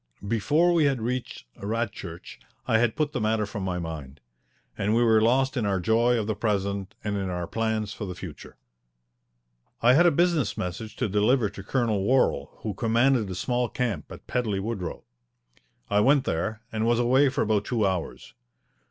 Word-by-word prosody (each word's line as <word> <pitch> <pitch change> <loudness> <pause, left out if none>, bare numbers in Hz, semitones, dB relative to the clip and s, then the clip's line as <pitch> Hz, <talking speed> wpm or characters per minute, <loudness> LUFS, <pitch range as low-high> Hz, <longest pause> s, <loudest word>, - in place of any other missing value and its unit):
Before 150 - +2
we 165 -3 +3
had 135 -3 +1
reached 125 - -4
Radchurch 105 -5 -5 0.3
I 110 - +3
had 120 -1 +1
put 150 -1 0
the 125 - -3
matter 110 0 +1
from 105 0 -6
my 90 -1 -2
mind, 75 -5 -6 0.6
and 105 +2 0
we 120 - +4
were 110 -2 +4
lost 130 +4 +2
in 120 - 0
our 100 -2 +1
joy 115 +5 +2
of 110 - -1
the 110 - -1
present 100 -1 -2
and 105 -1 -2
in 95 -1 -2
our 90 -1 -3
plans 110 0 -2
for 105 - -6
the 90 -2 -6
future. - - -10 1.2
I 120 +2 +5
had 175 +6 +6
a - - +5
business 165 - +1
message 100 +5 -5
to 125 - -1
deliver 105 +2 +2
to 100 - -9
Colonel 110 -2 0
Worral, 100 - +2
who 105 - -2
commanded 115 +1 +2
a 90 - -4
small 120 +5 -1
camp 110 -12 -3
at - - -10
Pedley 110 -6 -1
Woodrow. 95 -5 -4 0.8
I 105 - +2
went 135 +5 +4
there 110 +7 -2
and 110 0 -1
was 120 0 +3
away 130 +4 +4
for 130 - 0
about 105 -1 +1
two 115 -4 0
hours. 95 -3 -3
110 Hz, 185 wpm, -26 LUFS, 100-125 Hz, 1.2 s, had